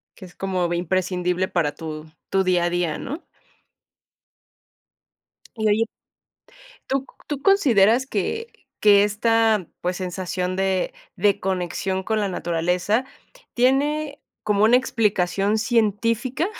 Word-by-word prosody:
Que 190 - -11
es 180 - -16
como 185 -3 -1
vi 175 - 0
Imprescindible 180 +1 0
para 155 -5 0
tu 155 -2 -7 0.2
tu 195 0 +2
día 180 -2 +2
a 175 - +1
día, 175 -3 -1
¿no? 300 +7 -6 2.3
Y, 220 -1 0
oye, 220 +2 +3 1.0
¿tú 270 0 -1 0.2
tú 285 -2 -4
consideras 260 - +4
que 450 - -2 0.3
que 205 -1 +6
esta, 220 -1 +2
pues, 180 0 -2
sensación 180 0 -3
de 190 -1 0 0.2
de 205 -2 +2
conexión 190 0 -2
con 220 +1 0
la 205 - 0
naturaleza, 180 +6 0 0.5
¿tiene 285 +4 +1 0.2
como 210 -1 +2
una 230 +3 +6
explicación 205 -4 +1
científica? 230 - +1
200 Hz, 120 wpm, -23 LUFS, 180-230 Hz, 2.3 s, que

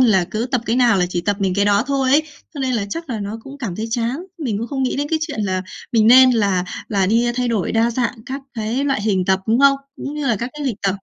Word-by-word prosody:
là 210 -8 +4
cứ 220 +3 -2
tập 255 -2 0
cái 230 - +1
nào 240 -5 +4
là 180 - +2
chỉ 175 -1 -2
tập 205 +3 -1
mình 190 -2 +1
cái 200 +1 +2
đó 205 0 +3
thôi 270 -1 +1
ấy, 295 +3 +5 0.3
cho 285 - -5
nên 260 -2 0
là 215 - 0
chắc 330 +6 -5
là 225 -3 -3
nó 205 +2 -5
cũng 275 +3 -11
cảm 215 -10 -4
thấy 220 - -3
chán. 235 +2 -1 0.2
Mình 240 -10 -2
cũng 230 - -3
không 270 -2 -2
nghĩ 255 - 0
đến 290 +1 -2
cái 320 - +1
chuyện 290 -8 -3
là 185 -2 -1 0.3
mình 220 -2 +4
nên 255 +2 +8
là 200 -6 +1 0.2
là 195 -3 +1
đi, 230 +4 +2
a, 240 - 0
thay 250 -1 0
đổi 220 -6 -1
đa 230 +1 +2
dạng 235 +1 -1
các 270 +1 -4
cái 230 +4 -2
loại 270 -5 0
hình 195 -4 +1
tập, 190 0 +2
đúng 230 +3 +2
không? 280 0 +6 0.2
Cũng 280 - -6
như 300 -2 -3
là 235 -4 +2
các 235 +5 -4
cái 295 -1 -5
lịnh 240 -6 -1
tập. 195 -1 +1
230 Hz, 300 wpm, -20 LUFS, 205-265 Hz, 0.3 s, nên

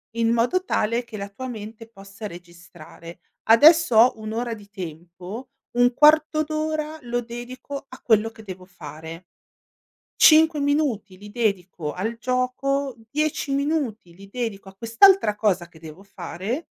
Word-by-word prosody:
in 230 0 +1
modo 245 +11 +1
tale 230 -3 0
che 230 -2 -10
la 200 0 -6
tua 260 +6 -7
mente 220 -1 -8
possa 195 -1 -12
registrare: 170 -2 -12 0.2
"Adesso 300 +4 +6
ho 230 +1 +5
un'ora 225 +2 -4
di 205 -2 -15
tempo, 180 +4 -9 0.3
un 245 0 +4
quarto 310 +2 +4
d'ora 310 0 -3
lo 240 0 -2
dedico 245 +4 -8
a 255 - -13
quello 225 -1 +2
che 225 - -14
devo 185 -2 -9
fare." 160 -2 -10 1.0
"5 315 -1 +6
minuti 280 -10 -1
li 205 +2 -12
dedico 190 -8 -2
al 225 +5 -4
gioco, 255 +3 -1
10 300 +1 -1
minuti 275 - -2
li 195 +2 -14
dedico 205 -4 -5
a 190 - -18
quest'altra 230 - +4
cosa 190 -5 0
che 170 -2 -19
devo 160 +3 -12
fare". 195 - -5
225 Hz, 145 wpm, -23 LUFS, 195-265 Hz, 1.0 s, Adesso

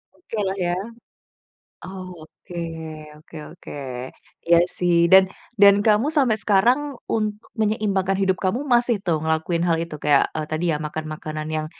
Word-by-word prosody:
Oke 230 -10 -8
lah 190 +1 -1
ya. 175 0 0 1.1
Oke, 180 -2 -10 0.6
oke 155 +1 -15 0.2
oke. 180 - -12 0.8
Iya 170 0 +7 0.2
sih 175 -1 +2 0.2
dan 190 0 +8 0.3
dan 200 0 +8
kamu 215 +6 +4
sampai 245 -6 +3
sekarang, 225 +7 +3 0.3
untuk 215 0 -2
menyeimbangkan 200 -3 0
hidup 190 -1 +1
kamu 200 +7 0
masih 240 -2 +3
tuh, 160 -4 0
ngelakuin 160 +2 0
hal 165 - +3
itu 155 -2 -8
kayak, 145 -2 +5
e 155 - -2
tadi 155 +3 -2
ya - - 0
makan 155 +1 -4
makanan 155 0 -6
yang 155 0 -2
185 Hz, 145 wpm, -22 LUFS, 160-210 Hz, 1.1 s, dan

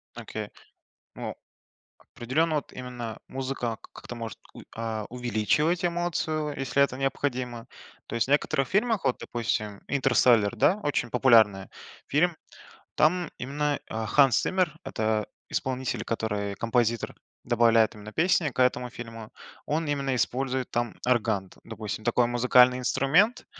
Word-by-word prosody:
Окей. - - -6 0.7
Ну, - - -5 0.8
определенно 155 +7 0
вот 145 - -4
именно 120 -3 -6
музыка 130 -4 -3 0.2
как-то - - -9
может 115 -2 -6 0.2
у - - -10
й - - -13
а, 110 -1 -3
увеличивать 125 - 0
эмоцию, 160 -3 -1
если 135 +1 +2
это 140 -2 +1
необходимо. 130 -3 -2 0.4
То - - -7
есть 115 -1 +1
в - - -4
некоторых 135 -2 +2
фильмах, 220 +1 +1
вот 125 - +1
допустим 105 -3 -3
"Интерстеллар" 120 -5 +3
да, 185 - +3
очень 140 -7 -1
популярный 110 -6 +4 0.4
фильм, 165 +4 +2 0.6
там 175 +2 +2
именно, 145 +3 -1
а, 110 0 -3
Ханс 135 0 +5
Циммер- 185 -5 0
это 110 -1 -1 0.2
исполнитель, 130 -1 -2
который 105 -3 -2
композитор, 115 +1 0 0.3
добавляет 115 -2 +4
именно 105 0 -10
песни 170 -1 +2
к 130 - -4
этому 125 -1 +2
фильму, 115 -2 -9 0.3
он 160 +2 -1
именно 140 -2 -1
использует 130 +1 -1
там 120 -1 -1
орган, 110 -6 +1
д - - -19
допустим, 110 -1 -6
такой 120 0 +3
музыкальный 125 +1 +5
инструмент 160 - +2
125 Hz, 135 wpm, -27 LUFS, 115-145 Hz, 0.8 s, Ханс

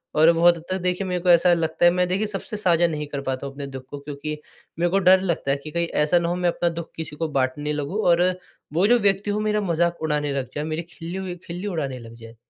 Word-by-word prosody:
और 160 +2 +6
बहुत 170 +1 +5
हद 160 - -11
तक 185 - 0
देखिए 180 +2 0
मेरे 180 -1 -2
को 180 - 0
ऐसा 175 +1 +6
लगता 165 0 +1
है 175 - +7
मैं 180 0 +1
देखिए 190 +4 0
सबसे 205 +1 -5
साझा 175 -4 +3
नहीं 150 -2 -4
कर 140 -1 -4
पाता 130 0 -3
हूँ 140 - -6
अपने 140 0 -6
दुःख 135 -1 -8
को 145 - -7
क्योंकि 150 +1 -6 0.4
मेरे 175 +1 +2
को 195 - +3
डर 185 0 +7
लगता 170 -7 -1
है 140 - +1
कि 155 - -7
कहीं 170 0 0 0.2
ऐसा 165 +4 +3
ना 170 0 -1
हो 175 - 0
मैं 180 -1 +1
अपना 175 0 0
दुःख 170 0 -6
किसी 160 -2 -6
को 165 +2 -2
बाँटने 145 +3 -1
लगूँ 150 +9 -2
और 175 0 +5 0.5
वो 185 +5 +3
जो 240 +1 +5
व्यक्ति 200 0 +2
वो 210 - -1
मेरा 210 0 0
मज़ाक 170 -2 0
उड़ाने 150 -2 0
लग 130 -2 -3
जाए, 150 - -2
मेरी 155 +1 -3
खिल्ली 180 +2 -6
उ - - -10
खिल्ली 175 +4 -5
उड़ाने 140 -9 -3
लग 115 0 -12
जाए। 115 0 -13
170 Hz, 270 wpm, -23 LUFS, 150-180 Hz, 0.5 s, है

